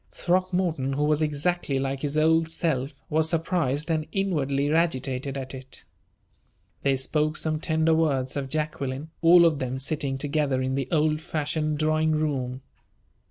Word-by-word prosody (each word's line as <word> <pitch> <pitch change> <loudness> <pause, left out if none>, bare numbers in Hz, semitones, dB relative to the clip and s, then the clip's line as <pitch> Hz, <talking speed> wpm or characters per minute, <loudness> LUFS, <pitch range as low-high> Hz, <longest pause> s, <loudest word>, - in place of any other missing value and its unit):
Throckmorton, 180 -6 0
who 145 +2 0
was 150 +1 +2
exactly 150 0 0
like 135 0 -2
his 145 0 -2
old 160 +1 +3
self, 150 -5 -1
was 160 +1 +1
surprised 165 -3 0
and 155 -1 -1
inwardly 145 -7 0
agitated 135 -4 0
at 130 -1 -6
it. 130 0 -7 1.0
They 140 -1 +2
spoke 150 +3 0
some 155 -1 -1
tender 160 0 +2
words 140 -5 +1
of 140 -2 -3
Jacqueline, 150 -1 -3
all 170 +1 +7
of 155 -4 +2
them 130 -1 -2
sitting 135 0 -2
together 145 -1 0
in 130 0 -1
the 135 -1 -1
old 155 -1 +1
fashioned 155 -1 -2
drawing 155 +1 +2
room. 135 -4 -2
150 Hz, 150 wpm, -26 LUFS, 135-160 Hz, 1.0 s, all